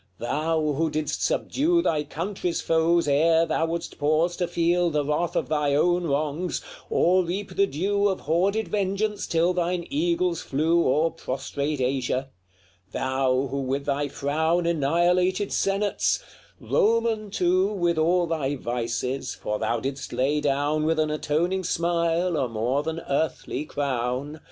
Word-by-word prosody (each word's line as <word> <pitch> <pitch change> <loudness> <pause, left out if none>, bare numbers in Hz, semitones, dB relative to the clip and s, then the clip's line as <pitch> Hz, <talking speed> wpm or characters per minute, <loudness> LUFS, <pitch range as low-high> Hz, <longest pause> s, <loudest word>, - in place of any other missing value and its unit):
Thou, 155 +5 0
who 165 +1 +1
didst 155 0 -2
subdue 340 +4 +1
Thy 150 -2 +1
country's 170 +4 -3
foes 165 0 +2
ere 160 +3 +4
thou 165 0 0
wouldst 170 +1 -5
pause 155 +4 +2
to 175 - 0
feel 175 +1 +2
The 150 -2 0
wrath 150 +4 -1
of - - 0
thy 150 -2 +1
own 175 +3 +2
wrongs, 150 +4 -1 0.3
or 185 +2 +3
reap 190 +4 -4
the 200 - +3
due 200 +7 0
Of 190 -2 -1
hoarded 195 +8 +1
vengeance 205 +1 -1
till 170 +2 +2
thine 175 -1 -1
eagles 345 +4 0
flew 165 +5 +1
O'er 155 +5 +2
prostrate 140 0 -3
Asia; 130 +1 -1 0.6
thou, 130 0 0
who 140 0 -2
with 135 +1 -2
thy 145 0 0
frown 160 +5 0
Annihilated 175 +5 +1
senates 195 +1 0 0.4
Roman, 225 -1 +1
too, 185 0 +2
With 175 -5 0
all 175 +2 +3
thy 150 -4 -1
vices, 125 +1 -3
for 105 0 -3
thou 115 +1 0
didst 135 +3 -5
lay 145 +3 +1
down 145 +2 +1
With 160 +1 +1
an 155 -1 +1
atoning 170 +5 0
smile 170 0 0
a 130 -4 0
more 115 +5 0
than 160 +2 -4
earthly 145 -1 -2
crown 130 -1 -2
LXXXIV. 155 +1 -10
160 Hz, 150 wpm, -25 LUFS, 140-180 Hz, 0.6 s, ere